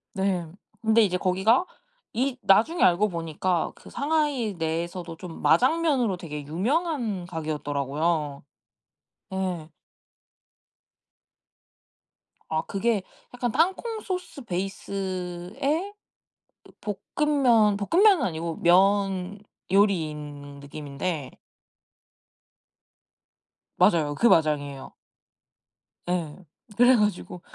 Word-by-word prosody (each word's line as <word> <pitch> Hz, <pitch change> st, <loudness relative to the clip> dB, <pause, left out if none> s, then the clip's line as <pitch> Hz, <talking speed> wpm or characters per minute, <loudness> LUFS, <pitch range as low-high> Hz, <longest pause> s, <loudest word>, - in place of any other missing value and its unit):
네. 190 Hz, -3 st, 0 dB, 0.3 s
근데 220 Hz, 0 st, +4 dB
이제 180 Hz, -3 st, +1 dB
거기가 195 Hz, -, +2 dB, 0.5 s
이 255 Hz, +3 st, -1 dB
나중에 230 Hz, -, +3 dB
알고 190 Hz, +4 st, +4 dB
보니까 170 Hz, +1 st, -1 dB
그 -, -, -15 dB
상하이 280 Hz, -, 0 dB
내에서도 170 Hz, +1 st, -3 dB
좀 170 Hz, -2 st, -9 dB
마장면으로 265 Hz, -, +3 dB
되게 150 Hz, -4 st, -6 dB
유명한 225 Hz, -, -1 dB
가게였더라고요. 150 Hz, -2 st, -2 dB, 0.9 s
예. 180 Hz, -4 st, -3 dB, 2.8 s
아 160 Hz, 0 st, 0 dB
그게 210 Hz, 0 st, 0 dB, 0.3 s
약간 245 Hz, -2 st, -2 dB
땅콩 380 Hz, -, 0 dB
소스 360 Hz, -6 st, -5 dB
베이스에 195 Hz, -, -3 dB, 0.7 s
그 -, -, -18 dB, 0.4 s
볶음면, 245 Hz, -9 st, +4 dB
볶음면은 345 Hz, -, +4 dB
아니고 165 Hz, -2 st, -3 dB
면 195 Hz, +1 st, +3 dB, 0.3 s
요리인 150 Hz, -7 st, 0 dB
느낌인데 145 Hz, +1 st, -5 dB, 2.5 s
맞아요. 150 Hz, -4 st, +3 dB
그 235 Hz, -, +3 dB
마장이에요. 145 Hz, -, +1 dB, 1.2 s
예. 170 Hz, -4 st, -1 dB, 0.4 s
그래 245 Hz, +2 st, +7 dB
가지고 210 Hz, -5 st, -1 dB
190 Hz, 200 characters per minute, -26 LUFS, 160-240 Hz, 2.8 s, 그래